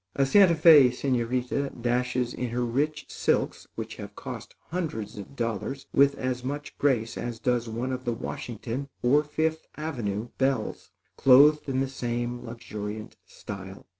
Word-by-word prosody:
A 135 - +3
Santa 180 +4 +6
Fé 155 -4 +8
señorita 125 +1 -1
dashes 125 0 0
in 125 -1 -3
her 120 +1 -1
rich 150 +6 -1
silks - - 0
which - - -6
have - - -8
cost - - -8
hundreds 145 - -3
of 105 +6 -9
dollars 115 +3 -3
with 140 0 +5
as 130 -1 -2
much 145 +3 -5
grace 120 -6 +1
as 120 -1 -4
does 120 0 0
one 120 +4 -3
of 130 0 -4
the 120 - -1
Washington 120 +4 -5
or 140 +5 +4
Fifth 160 +2 -1
Avenue 120 -8 -3
belles, 130 -4 0 0.3
clothed 145 +3 +6
in 130 0 +1
the 135 - 0
same 120 -2 -3
luxuriant 110 -2 -6
style. 95 -1 -9
125 Hz, 150 wpm, -27 LUFS, 115-140 Hz, 0.3 s, Fé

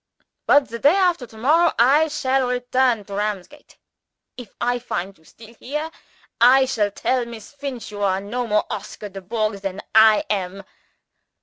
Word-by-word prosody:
But 285 -2 +4
the 235 +1 -6
day 290 +8 +4
after 355 -9 +1
to 220 - -16
morrow, 315 +9 +3
I 280 +7 +4
shall 270 -4 0
return 250 -2 0
to 200 - -10
Ramsgate. 210 +7 -5 0.6
If 245 -5 -11
I 245 0 0
find 195 -5 -5
you 160 - -27
still 225 +7 -16
here, 300 +7 -5 0.7
I 265 - +3
shall 220 -6 0
tell 250 +5 -1
Miss 230 +2 -11
Finch 275 -6 -7
you 205 -1 -7
are 190 -1 +1
no 235 +5 -4
more 210 -1 +1
Oscar 210 - -7
Dubourg 200 +2 -3
than 195 0 -4
I 220 -1 +6
am. 195 -1 -3
235 Hz, 165 wpm, -21 LUFS, 205-265 Hz, 0.7 s, I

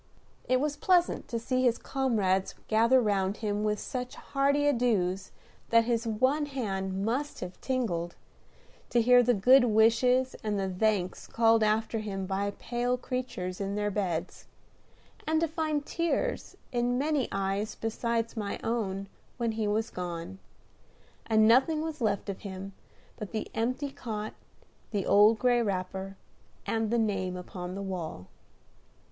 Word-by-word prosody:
It 255 0 +4
was 295 +1 -1
pleasant 355 +2 +2
to 235 - -2
see 255 +3 -1
his 245 -2 +3
comrades 210 -8 0
gather 230 +4 +4
round 200 -3 +1
him 210 -1 -2
with 210 0 +1
such 250 +1 -5
hearty 280 +1 +1
adieus 210 -9 +1 0.4
that 230 0 +5
his 235 0 0
one 260 +7 +1
hand 195 -7 -3
must 270 +6 -2
have 180 0 -7
tingled; 190 -10 -2 0.7
to 240 - +3
hear 245 +2 +6
the 245 0 +3
good 250 +6 +6
wishes 240 +4 +3
and 210 -2 -1
the 195 - -1
thanks 190 -1 0
called 225 -1 +3
after 220 +1 +1
him 195 -3 -4
by 195 +1 -1
pale 245 +1 -1
creatures 245 -8 -4
in 200 0 -2
their 205 0 0
beds; 180 -4 -3 0.8
and 315 0 +2
to 330 - +2
find 310 -2 -2
tears 340 +11 -2
in 245 0 +1
many 290 0 +1
eyes 195 +2 -1
beside 230 +1 -2
my 210 -3 -3
own 200 -4 -2 0.3
when 235 -2 0
he 220 -1 -1
was 220 +2 0
gone, 180 +1 -5 0.9
and 220 -1 +5
nothing 275 +7 +4
was 315 -3 -5
left 205 -3 0
of 195 -1 -4
him 195 0 -7 0.4
but 210 -4 -6
the 215 -2 -4
empty 255 +5 -1
cot, 215 -4 -5 0.6
the 205 -4 -2
old 210 +2 +6
gray 245 0 +3
wrapper, 190 -1 -3 0.5
and 225 -1 0
the 235 - +1
name 195 -5 0
upon 180 0 -7
the 200 - -4
wall. 170 - -5
225 Hz, 150 wpm, -29 LUFS, 195-250 Hz, 0.9 s, hear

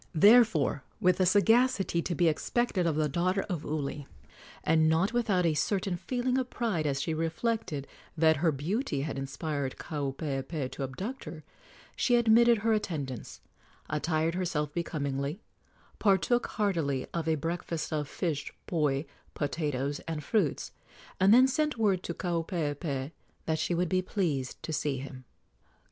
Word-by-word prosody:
Therefore, 190 - +5 0.2
with 180 0 +3
a 185 - +4
sagacity 215 -1 +3
to 175 - -3
be 175 0 +3
expected 180 +3 0
of 160 - +1
the 155 0 +2
daughter 180 +6 +1
of 175 -6 -4
Uli, 145 -2 -3 0.6
and 160 -1 +4
not 170 +8 +2
without 210 -7 +2
a 165 - +3
certain 185 +4 0
feeling 250 +7 -1
of 255 -1 -3
pride 200 -11 -1
as 135 -1 0
she 160 - -1
reflected 165 - -2 0.3
that 160 -1 +4
her 160 +2 +2
beauty 155 - -2
had 140 -1 -3
inspired 140 0 -3
Kaupeepee 140 -1 -3
to - - -7
abduct 190 - -5
her, 155 0 -8 0.5
she 245 - +3
admitted 235 0 +5
her 225 - +4
attendants, 145 - -4 0.5
attired 160 +2 0
herself 160 -5 -2
becomingly, 145 -1 -2 0.6
partook 200 +4 +3
heartily 165 - 0
of 165 -1 -2
a 160 - +3
breakfast 165 +1 -3
of 150 -2 -1
fish, 155 -3 -3
poi, 150 -4 0 0.3
potatoes 145 -1 -2
and 160 -2 -3
fruits, 195 - 0 0.5
and 190 +2 +5
then 255 +3 +8
sent 300 +1 0
word 200 -5 +2
to 170 - -5
Kaupeepee 160 -5 -2 0.3
that 160 -1 0
she 175 - 0
would 175 0 0
be 185 0 +2
pleased 160 - -2
to 160 - -4
see 145 -2 -1
him. 130 -1 -8
165 Hz, 150 wpm, -29 LUFS, 145-195 Hz, 0.6 s, then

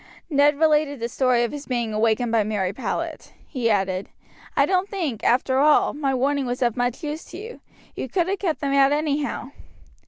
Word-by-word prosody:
Ned 285 0 +4
related 300 -3 +2
the 230 - -2
story 245 0 +2
of 235 - -1
his 290 0 -7
being 235 -4 -1
awakened 225 +2 +1
by 225 -2 +3
Mary 200 -3 -1
Powlett. 260 - -4
He 245 -5 -1
added, 195 -2 0 0.5
"I - - +5
don't 375 +1 0
think, 305 - -3
after 260 +2 +2
all, 300 +1 +4
my 285 -2 -1
warning 275 +1 0
was 245 +1 -1
of 235 -2 +1
much 245 +5 -2
use 300 +1 -4
to - - -10
you. 455 +5 -9 0.3
You - - -5
could 355 -3 0
have 390 0 -1
kept 330 -6 -2
them 280 -1 0
out 275 0 +5
anyhow." 290 -3 -1
275 Hz, 195 wpm, -23 LUFS, 235-300 Hz, 0.5 s, I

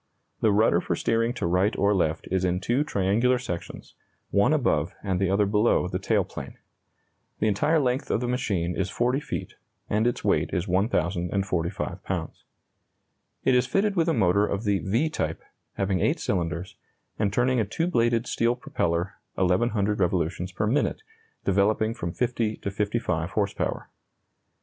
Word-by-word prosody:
The 110 - +3
rudder 105 +3 +3
for - - -1
steering 115 +1 +1
to - - -2
right 90 +4 +2
or 100 +1 +3
left 80 -5 0
is 95 -1 +1
in 90 0 +1
two 120 +9 +1
triangular 115 +2 +2
sections, 90 -9 -6 0.4
one 100 +7 +3
above 105 - +1
and 95 -3 -1
the 95 -1 +1
other 100 +2 +3
below 105 -2 +2
the 90 +1 -3
tail 100 0 +2
plane. 70 -7 -9 0.8
The 110 - +1
entire 150 +10 +2
length 130 -1 0
of - - +1
the 125 - -2
machine 95 -9 -1
is 95 -1 -1
40 125 +6 +1
feet, 150 - -5 0.4
and 110 +3 +2
its 120 - -1
weight - - +2
is 90 +3 -1
1,045 90 -1 -1
pounds. - - -4 1.0
It 130 - +3
is 125 0 +3
fitted 200 +1 +1
with 170 -2 +2
a - - +3
motor 100 -1 +3
of 100 +2 -2
the 100 -3 +1
"V" 115 +11 +1
type, 80 - -3 0.3
having 95 -1 0
8 - - +1
cylinders, 85 -1 -2 0.4
and 105 -2 +1
turning 125 +3 +2
a - - +3
2 110 +11 -2
bladed 120 -7 +2
steel 120 0 +1
propeller 85 -6 -2 0.2
1,100 100 +2 +1
revolutions 90 0 0
per 95 - -1
minute, 140 - 0 0.4
developing 105 +3 +2
from 85 -6 -4
50 115 0 -1
to 100 - -4
55 100 -5 -1
horse 100 0 0
power. - - -3
100 Hz, 165 wpm, -26 LUFS, 90-120 Hz, 1.0 s, The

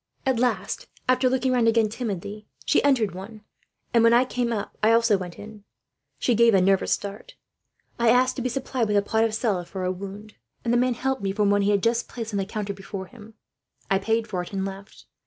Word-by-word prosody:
"At 260 -3 +1
last, 255 - -1 0.2
after 255 0 +3
looking 260 0 +1
round 245 -2 +3
again 225 -1 +4
timidly, 210 -2 -5 0.2
she - - +3
entered 240 -9 +2
one; 200 +4 -9 0.5
and 230 -1 +5
when 230 0 +6
I 250 +2 +5
came 245 -2 -2
up, 210 -3 -4
I 220 +1 +4
also 230 -2 +4
went 180 -3 -6
in. 210 -1 -11 0.5
She 245 - +1
gave 230 -1 +5
a - - +5
nervous 190 +1 +2
start. 200 0 -4 0.6
I 235 -1 +4
asked 250 +2 +4
to - - -2
be 255 - -1
supplied 255 -2 -2
with 210 -1 +2
a 200 - +3
pot 220 +2 +1
of 225 -1 0
salve 200 -7 -1
for 190 -2 -5
a 185 - 0
wound, 200 +3 -8 0.3
and 235 - +1
the - - +4
man 250 0 +1
helped 265 +2 -2
me 195 -1 -1
from 205 0 +1
one 205 0 +3
he 200 - +2
had 200 -2 +2
just 235 +1 +1
placed 225 -3 -6
on 200 - 0
the 195 - -1
counter 205 0 -4
before 195 0 -7
him. 220 0 -15 0.6
I 195 - +4
paid 225 +3 0
for 185 -5 -2
it, 175 - -9
and 195 -1 -2
left. 195 +1 -9
220 Hz, 230 wpm, -25 LUFS, 200-240 Hz, 0.6 s, when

